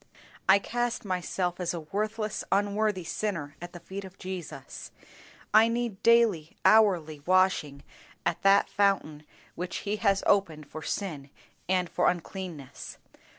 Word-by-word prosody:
I 190 - +9
cast 240 +3 -2
myself 180 -1 -2
as 180 -1 -1
a - - -3
worthless 215 +5 -3
unworthy 205 -1 +1
sinner 165 -5 -3
at 175 0 -7
the 175 - -10
feet 195 +3 -7
of 190 0 -12
Jesus. 185 -3 -7 0.6
I 220 +1 +7
need 230 -3 -2
daily, 225 -9 +3
hourly 180 -9 +4
washing 185 -7 +2 0.4
at - - 0
that 195 0 +5
fountain 180 -7 0 0.3
which 180 +1 -5
He 205 +1 -1
has 200 -3 +2
opened 165 -7 +1
for 155 - -8
sin 155 -7 -4 0.4
and 185 -1 +2
for - - +2
uncleanness. 175 -5 -6
190 Hz, 135 wpm, -28 LUFS, 170-205 Hz, 0.6 s, I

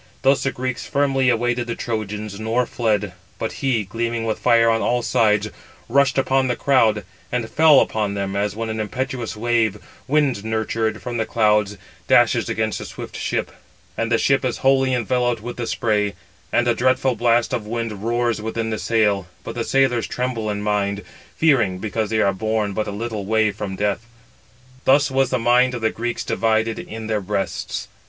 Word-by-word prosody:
Thus 135 +1 +4
the 135 - 0
Greeks 125 0 -4
firmly 135 -2 +2
awaited 120 0 0
the 115 - -3
Trojans, 105 -4 -4
nor 115 +3 0
fled. 105 -5 -1 0.2
But 110 - -3
he, 130 -6 +1
gleaming 115 +3 -3
with 110 -1 -2
fire 115 0 +4
on 115 0 +2
all 120 0 +1
sides, 105 -2 +2 0.4
rushed 140 +2 +3
upon 135 0 +2
the 125 - 0
crowd; 115 -7 +2 0.3
and 120 -2 -1
fell 155 +1 +6
upon 105 -2 0
them, 100 -1 -3
as 100 0 -1
when 115 0 -3
an 110 0 -3
impetuous 125 +2 -3
wave, 115 -2 +1 0.3
wind 140 -7 +1
nurtured 110 0 -2
from 120 -1 -3
the 110 -1 -1
clouds, 105 -2 +2 0.3
dashes - - +4
against 110 -1 -1
a - - -6
swift - - -8
ship, - - -2 0.4
and 115 +1 -2
it - - +5
[the - - +3
ship] 135 +4 +2
is 125 -2 -1
wholly 135 -1 +4
enveloped 120 -1 0
with 120 +1 -6
the 120 -1 -3
spray, 105 -3 0 0.4
and 120 - +2
a 120 - +4
dreadful 130 +2 +2
blast 120 +2 +2
of 115 -4 -2
wind 115 -3 -4
roars 120 -1 0
within 110 +1 -3
the 110 - -2
sail: 105 -5 +1 0.2
but 115 - -6
the 115 0 -2
sailors 130 -2 +2
tremble 125 -4 -2
in 105 0 -3
mind, 100 -1 -1 0.3
fearing, 120 - +3
because 110 +2 -2
they 110 -1 +1
are 100 - +2
borne 110 0 -1
but 110 +2 -2
a - - -3
little 105 -1 -4
way 110 -1 +2
from 100 -1 -5
death: 105 +4 -1 0.8
thus 140 +1 +4
was 135 -1 +2
the 130 - +1
mind 125 +2 +3
of 120 - -5
the 110 0 +1
Greeks 120 +1 -3
divided 110 0 0
in 110 0 -7
their 110 -1 -1
breasts. 100 +1 -3
115 Hz, 190 wpm, -21 LUFS, 105-125 Hz, 0.8 s, fell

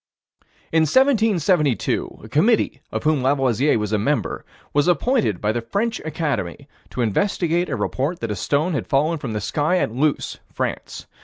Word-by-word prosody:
In 160 0 +4
1772, 195 - +2
a - - -9
committee, 155 - +2
of - - -3
whom 155 -3 +2
Lavoisier 135 0 +2
was 105 0 -2
a 105 - +2
member, 145 +8 -1 0.3
was 145 +2 +2
appointed 180 - +1
by 105 - 0
the 120 +1 -2
French 210 - -2
Academy, 150 - -3 0.2
to 125 - -3
investigate 170 - 0
a - - -1
report 150 +7 -2
that 115 -2 -2
a - - -1
stone 150 - 0
had 140 - -2
fallen 155 +4 +1
from 120 -6 -5
the 105 - -1
sky 150 - 0
at 145 - 0
Luce, 140 +5 -1
France. - - -4
150 Hz, 165 wpm, -22 LUFS, 120-175 Hz, 0.3 s, In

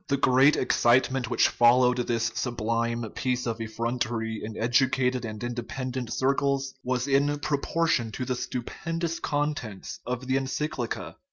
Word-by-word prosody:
The 140 - +1
great 130 +2 +5
excitement 125 0 +2
which - - +4
followed 125 +1 +4
this 115 -2 0
sublime 115 -1 -1
piece 125 -1 -1
of 115 -1 -3
effrontery 115 0 -2
in 110 0 -6
educated 125 +1 +2
and 110 0 -6
independent 125 0 -4
circles 135 +1 0
was 125 +1 -1
in 140 +1 +2
proportion 145 -4 0
with 130 -1 -4
the 130 - +1
stupendous 165 +7 -3
contents 145 -9 -3
of 125 +1 -4
the 130 +1 +1
ency 135 +3 -1
clica. 120 -6 -5
125 Hz, 140 wpm, -27 LUFS, 120-135 Hz, -, great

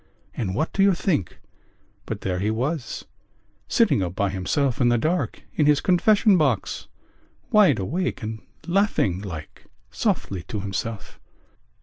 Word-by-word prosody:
And 95 -5 -3
what 155 - -1
do 195 - +1
you 195 -1 +5
think 160 - -1 0.7
but - - -4
there 90 -1 -2
he 105 +3 0
was, 130 +6 -2 0.6
sitting 215 - +3
up 90 -1 -3
by 100 -1 0
himself 130 +8 0
in 120 - +4
the 120 - +3
dark 165 +9 -1
in 150 - +2
his 150 -1 +5
confession 200 +2 +4
box, 130 -10 0 0.6
wide 200 - +5
awake 140 - -2
and 110 0 -5 0.2
laughing 175 - +1
like 80 -7 -8 0.3
softly 95 -3 -1
to 105 - -4
himself?" 100 +2 -5
120 Hz, 140 wpm, -24 LUFS, -, 0.7 s, you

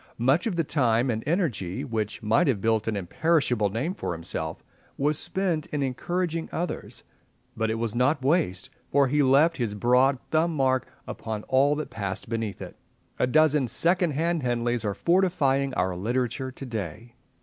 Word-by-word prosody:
Much 135 - +2
of 205 - -2
the 165 - +1
time 125 -4 +1
and 110 0 -3
energy 130 - -1
which 110 -4 -3
might 110 +5 +3
have 125 -7 +1
built 110 +1 +1
an 110 - 0
imperishable 120 - +1
name 125 - -2
for 90 - -4
himself 85 0 -5 0.3
was 150 +2 +1
spent 175 -1 -1
in 145 -2 -2
encouraging 165 +5 -2
others; 175 +1 -4 0.5
but 110 0 -1
it 110 - 0
was 115 -2 -2
not 130 +2 +1
waste, 135 - +1 0.2
for 140 -1 +4
he 150 +2 +2
left 145 +5 +4
his 115 -4 -2
broad 125 +5 +3
thumb 160 +1 +2
mark 130 -2 +1 0.2
upon 110 -2 -5
all 140 +3 +3
that 155 - -5
passed 100 -3 -4
beneath 115 -3 -3
it. - - -10 0.4
A - - +3
dozen 150 -1 +3
second 175 +4 +2
hand 165 +3 0
Henleys 120 -2 -1
are 100 -2 -2
fortifying 145 - +2
our 90 0 0
literature 120 +6 -2
to 135 - -9
day. 115 0 -6
130 Hz, 170 wpm, -26 LUFS, 110-155 Hz, 0.5 s, for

